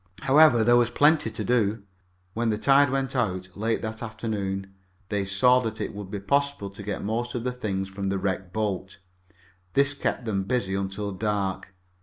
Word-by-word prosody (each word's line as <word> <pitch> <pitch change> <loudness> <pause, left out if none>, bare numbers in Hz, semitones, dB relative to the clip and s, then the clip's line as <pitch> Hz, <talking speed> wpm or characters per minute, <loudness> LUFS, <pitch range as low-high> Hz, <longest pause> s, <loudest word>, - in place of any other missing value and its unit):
However, 135 -3 +6
there 120 +2 +5
was 120 -1 +3
plenty 145 0 +3
to 110 0 -4
do. 105 -2 +1 0.5
When 115 0 0
the 105 - 0
tide 140 +5 +5
went 135 0 -1
out 95 -6 -2
late 110 +2 -1
that 110 0 -5
afternoon 100 -4 -4 0.4
they 100 -1 -1
saw 125 +7 +4
that 110 -3 -4
it 110 - -3
would 100 -2 -7
be 100 0 -4
possible 140 -2 0
to 100 - -10
get 105 0 -4
most 120 +4 -2
of 120 - -2
the 125 - -1
things 100 -6 -3
from 95 0 -4
the 100 - 0
wrecked 95 -1 -2
boat. 100 -3 -3 0.8
This 140 +3 +3
kept 135 -3 -2
them 100 -4 0
busy 120 -5 -1
until 100 +1 -3
dark. 95 -2 -2
110 Hz, 185 wpm, -26 LUFS, 95-120 Hz, 0.8 s, However